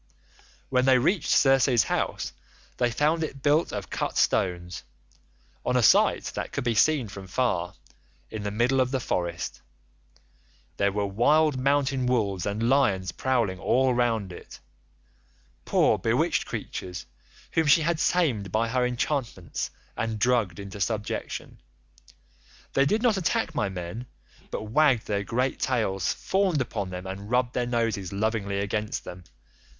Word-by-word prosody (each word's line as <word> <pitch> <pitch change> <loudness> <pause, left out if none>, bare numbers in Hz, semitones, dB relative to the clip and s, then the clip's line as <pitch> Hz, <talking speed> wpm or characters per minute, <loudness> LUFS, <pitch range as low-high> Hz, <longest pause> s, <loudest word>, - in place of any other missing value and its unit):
"When 125 -1 +2
they 130 -1 +6
reached 160 +6 +1
Circe's 135 -3 +4
house - - -2 0.4
they 120 - +2
found 150 +7 +1
it 135 -4 -6
built 150 +3 +3
of - - -6
cut - - -2
stones, 90 -1 0 0.8
on 125 - +1
a 125 - +2
site - - +5
that - - -4
could - - -3
be 120 -1 +1
seen 135 +2 +3
from 100 -1 -9
far, 90 -5 -1 0.6
in 110 - -5
the 105 - -2
middle 120 +5 +2
of 130 - +1
the 130 0 -1
forest. 85 -7 -3 1.2
There 100 0 +2
were 100 +1 -1
wild 140 +8 +3
mountain 135 -1 +1
wolves 100 -7 0
and 105 +3 -1
lions 100 -10 +2
prowling 115 -7 0
all 130 +4 +2
round 115 -5 0
it—poor 65 -5 -4
bewitched - - +1
creatures 90 -2 -6 0.5
whom 160 -2 +1
she 155 +3 +5
had 170 0 0
tamed 125 - +1
by 115 +3 +1
her 125 +1 +1
enchantments 125 - -2 0.3
and 115 -1 -2
drugged 110 -5 +1
into 100 0 -8
subjection. 105 +1 -3 1.1
They 135 +1 +3
did 220 - +1
not 230 -5 +3
attack 190 0 0
my 105 -9 0
men, 95 +6 -6 0.4
but - - -4
wagged 125 +2 +3
their 100 -1 -1
great 125 +6 -1
tails, 110 -7 0
fawned 190 -5 0
upon 105 -6 -3
them, 90 0 -6
and 95 +2 -7
rubbed 125 0 +1
their 125 -1 -1
noses 115 -6 -1
lovingly 100 -1 -1
against 105 +2 -2
them. 90 0 -10
115 Hz, 145 wpm, -26 LUFS, 100-135 Hz, 1.2 s, they